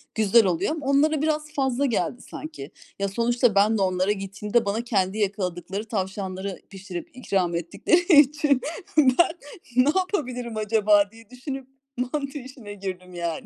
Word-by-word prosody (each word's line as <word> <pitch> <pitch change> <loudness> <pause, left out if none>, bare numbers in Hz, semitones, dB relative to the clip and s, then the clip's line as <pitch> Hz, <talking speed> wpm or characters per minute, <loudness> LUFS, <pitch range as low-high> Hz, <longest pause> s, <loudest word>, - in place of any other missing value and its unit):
güzel 220 0 +5
oluyor. 185 - 0
Ama 310 -3 -4
onlara 290 +2 +3
biraz 305 -1 -1
fazla 270 -1 0
geldi 230 -2 -1
sanki. 295 - -9 0.3
Ya, 200 - 0
sonuçta 235 +1 +1
ben 210 +2 +4
de - - -1
onlara 185 +1 +1
gittiğimde 205 +3 -1
bana 215 +4 -1
kendi 195 -3 0
yakaladıkları 195 -1 -2
tavşanları 190 -2 -4
pişirip 190 -2 -7
ikram 185 -8 0
ettikleri 290 - +3
için, 290 -1 +1 0.4
ben 280 +3 +5 0.4
ne 255 +3 +5
yapabilirim 250 - -2
acaba 210 -1 +3
diye 225 -1 -17
düşünüp. 265 +1 -7 0.5
mantı 280 -1 -3
işine 250 -5 -10
girdim 185 -2 -7
yani. 170 -2 -4
215 Hz, 145 wpm, -25 LUFS, 195-265 Hz, 0.5 s, güzel